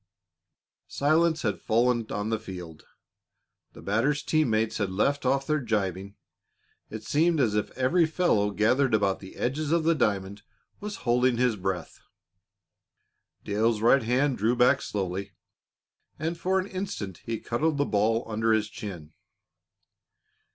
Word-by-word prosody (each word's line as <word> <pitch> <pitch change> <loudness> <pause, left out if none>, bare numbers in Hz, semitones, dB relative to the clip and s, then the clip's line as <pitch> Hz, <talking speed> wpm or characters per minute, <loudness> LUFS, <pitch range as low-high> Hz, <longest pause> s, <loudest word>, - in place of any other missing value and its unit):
Silence 160 +3 +1
had 100 -3 -1
fallen 120 0 +1
on 105 +2 -2
the 110 - 0
field. 90 -7 -10 0.9
The - - -13
batter's 130 +8 0
team 155 -4 +1
mates 110 0 0
had 100 -3 0
left 135 +8 0
off 135 +1 +1
their 155 +1 +1
gibing. 100 - -2 0.7
It - - -7
seemed 160 +2 +2
as 115 -6 +2
if 105 0 -1
every 160 +6 +3
fellow 155 - +1
gathered 110 +5 +2
about 100 -2 +1
the 95 - -12
edges 145 +4 -2
of 170 -1 +2
the 165 +1 +3
diamond 100 -7 -1 0.4
was 210 0 -5
holding 125 0 +2
his 125 -2 +2
breath. 95 -2 -4 1.4
Dale's 110 +2 +1
right 120 +5 +4
hand 125 +2 +1
drew 115 +4 +2
back 125 +3 +4
slowly, 95 0 -4 0.8
and 165 +3 -2
for 185 +3 0
an 185 - -2
instant 185 - -5
he 115 -2 -3
cuddled 150 +6 -1
the 145 - +1
ball 110 +1 +1
under 110 0 0
his 110 -1 0
chin. 90 -8 -8
115 Hz, 145 wpm, -27 LUFS, 105-145 Hz, 1.4 s, right